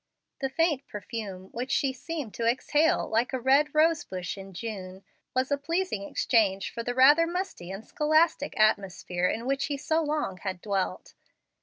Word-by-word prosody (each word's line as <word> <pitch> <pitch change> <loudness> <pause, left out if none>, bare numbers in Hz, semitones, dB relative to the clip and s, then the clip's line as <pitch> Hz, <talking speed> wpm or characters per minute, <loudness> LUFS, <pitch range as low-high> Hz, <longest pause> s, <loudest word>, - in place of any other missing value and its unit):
The 270 - -1
faint 300 -2 +1
perfume 200 -2 -6
which 250 +3 -4
she 275 -1 +1
seemed 280 -3 -6
to 230 - -1
exhale 295 +6 +2
like 230 +4 0
a 260 - 0
red 280 +4 +3
rosebush 305 - +1
in 195 -1 -10
June 190 -2 -7 0.3
was 260 +2 +1
a 285 - +1
pleasing 330 - -2
exchange 195 -5 +1
for 235 - -3
the 245 +1 -3
rather 290 +6 +6
musty 350 - -4
and 195 +3 -7
scholastic 310 -4 +1
atmosphere 185 -4 +1
in 230 +5 -2
which 275 +1 0
he 285 -1 -2
so 315 +3 0
long 295 - -2
had 190 -1 -4
dwelt. 195 -1 -2
250 Hz, 165 wpm, -28 LUFS, 195-300 Hz, 0.3 s, rather